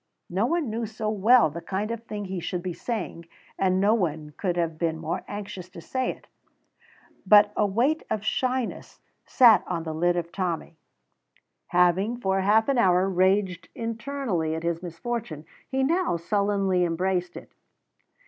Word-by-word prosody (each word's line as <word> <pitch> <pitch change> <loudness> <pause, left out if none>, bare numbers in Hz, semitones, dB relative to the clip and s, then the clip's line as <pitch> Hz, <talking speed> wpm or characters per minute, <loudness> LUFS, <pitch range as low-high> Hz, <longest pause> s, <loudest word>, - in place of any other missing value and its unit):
No 195 +6 +1
one 330 -6 -1
knew 225 +1 -2
so 220 0 -4
well 215 - +4
the 170 +3 -7
kind 200 +5 -3
of 230 -1 -5
thing 205 -2 -5
he 190 -1 -4
should 175 +1 -4
be 180 -2 -3
saying, 180 -6 -5 0.3
and 185 -1 +2
no 205 +3 +4
one 155 -8 -1
could 180 -3 -2
have 165 -2 -1
been 165 -2 0
more 160 0 -4
anxious 195 -3 -7
to 175 - -11
say 260 +10 -2
it, - - -7 1.0
but 205 +1 +6
a 210 - +2
weight 250 +11 +1
of 215 0 -2
shyness 255 0 -2 0.3
sat 240 -5 +6
on 170 -2 -2
the 160 -1 -4
lid 175 +2 +1
of 170 -1 -3
Tommy. 175 -3 -3 0.9
Having 180 +6 +2
for 195 -4 0
half 215 +3 +3
an 275 -3 +2
hour 185 -2 +4
raged 185 -2 +1
internally 230 - -2
at 160 - -5
his 170 -1 -1
misfortune, 175 -2 -5 0.2
he 265 0 0
now 335 - +1
sullenly 195 0 +1
embraced 175 +1 -1
it. - - -11
190 Hz, 165 wpm, -26 LUFS, 175-225 Hz, 1.0 s, but